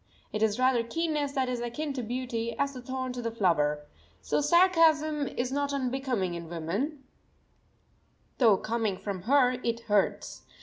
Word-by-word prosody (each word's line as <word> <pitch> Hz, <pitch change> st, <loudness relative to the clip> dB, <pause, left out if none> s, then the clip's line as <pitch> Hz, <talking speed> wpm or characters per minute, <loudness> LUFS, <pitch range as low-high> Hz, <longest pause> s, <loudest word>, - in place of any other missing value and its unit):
It 215 Hz, -, -2 dB
is 215 Hz, -1 st, +2 dB
rather 255 Hz, -1 st, +3 dB
keenness 295 Hz, +3 st, -2 dB
that 265 Hz, -2 st, 0 dB
is 250 Hz, -1 st, -2 dB
akin 275 Hz, +5 st, -3 dB
to 260 Hz, -, -3 dB
beauty, 235 Hz, -1 st, -3 dB
as 280 Hz, 0 st, 0 dB
the 255 Hz, -, -8 dB
thorn 260 Hz, 0 st, -4 dB
to 250 Hz, -, -5 dB
the 230 Hz, -, -2 dB
flower. 150 Hz, -9 st, +1 dB, 0.3 s
So -, -, 0 dB
sarcasm 310 Hz, -3 st, +4 dB
is 245 Hz, +1 st, -3 dB
not 285 Hz, 0 st, -1 dB
unbecoming 255 Hz, -8 st, -1 dB
in 170 Hz, -1 st, -7 dB
woman, 200 Hz, -, -3 dB, 1.4 s
though 225 Hz, -6 st, +6 dB
coming 220 Hz, -3 st, -1 dB
from 195 Hz, -1 st, -5 dB
her 270 Hz, -3 st, +5 dB
it 230 Hz, 0 st, -1 dB
hurts. 205 Hz, -3 st, 0 dB
250 Hz, 160 wpm, -28 LUFS, 215-280 Hz, 1.4 s, though